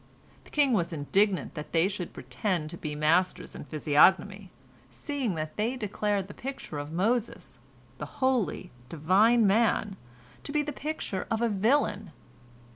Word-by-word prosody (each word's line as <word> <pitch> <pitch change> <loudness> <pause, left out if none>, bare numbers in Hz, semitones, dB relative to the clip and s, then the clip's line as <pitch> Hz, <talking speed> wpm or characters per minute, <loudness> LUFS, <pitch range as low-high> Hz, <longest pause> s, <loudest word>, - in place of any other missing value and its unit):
The - - -16
king 285 -4 +2
was 175 -5 +1
indignant 185 +6 0
that 150 -2 -8
they 165 +2 +4
should 190 -3 -5
pretend 155 - -3
to - - -7
be 150 -2 -5
masters 165 +5 +1
in - - -8
physiognomy, 190 +6 +3 0.4
seeing 275 - -3
that 155 -1 -5
they 225 +5 0
declared 205 -3 -2
the 205 - -10
picture 265 - -6
of 145 +1 -6
Moses, 220 +7 -1 0.4
the - - -5
holy, 255 -8 0 0.2
divine 200 +9 +3
man, 210 -1 +2 0.4
to - - -7
be 300 0 +1
the 295 0 -5
picture 295 -10 -4
of 225 +1 0
a 235 - +2
villain. 210 -1 +1
200 Hz, 150 wpm, -28 LUFS, 170-235 Hz, 0.4 s, they